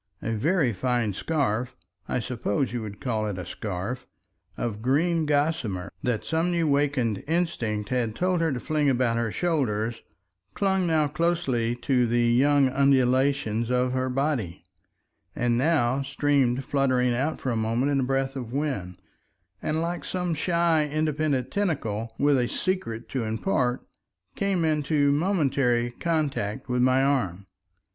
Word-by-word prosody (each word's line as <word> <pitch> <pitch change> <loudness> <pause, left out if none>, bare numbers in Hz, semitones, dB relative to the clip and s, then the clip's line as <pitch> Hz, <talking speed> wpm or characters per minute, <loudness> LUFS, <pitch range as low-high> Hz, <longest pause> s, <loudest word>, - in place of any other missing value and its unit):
A 115 - -2
very 135 - +1
fine 120 0 0
scarf—I 125 - -3
suppose 120 0 -2
you 120 - -2
would 105 -2 -7
call 110 -4 -1
it 100 -3 -4
a 90 - -5
scarf—of 105 +2 -6
green 155 +6 +1
gossamer, 145 - 0
that 110 -3 -1
some 160 +6 0
new 170 -2 +1
wakened 140 -7 +1
instinct 120 - -1
had 120 -4 -1
told 180 -1 +1
her 165 -2 +2
to 130 - -2
fling 150 +2 +1
about 120 -3 +1
her 115 -2 -1
shoulders, 120 -10 -1 0.5
clung 190 -2 +1
now 155 -2 +2
closely 145 -8 0
to 125 0 +1
the 120 +1 +2
young 135 +4 +4
undulations 130 -3 +2
of 125 0 +1
her 130 0 0
body, 125 - -1 0.7
and 120 -1 +1
now 135 -2 +2
streamed 135 -2 +1
fluttering 130 -3 +2
out 140 +6 -1
for 130 - -2
a - - -1
moment 115 +5 0
in 140 - +2
a - - +1
breath 135 +1 -1
of 125 -4 -5
wind, 125 -11 -3 0.6
and 160 +1 -1
like 175 +1 -3
some 180 -2 -2
shy 165 -1 +2
independent 150 -4 0
tentacle 120 - -1
with 145 -2 +3
a 120 - +1
secret 120 -11 -2
to 130 -3 -2
impart, 125 - 0 0.5
came 195 -4 0
into 150 -2 +2
momentary 140 -8 +1
contact 140 -8 -1
with 125 -1 0
my 130 +1 +4
arm. 100 -10 0
130 Hz, 145 wpm, -26 LUFS, 120-155 Hz, 0.7 s, young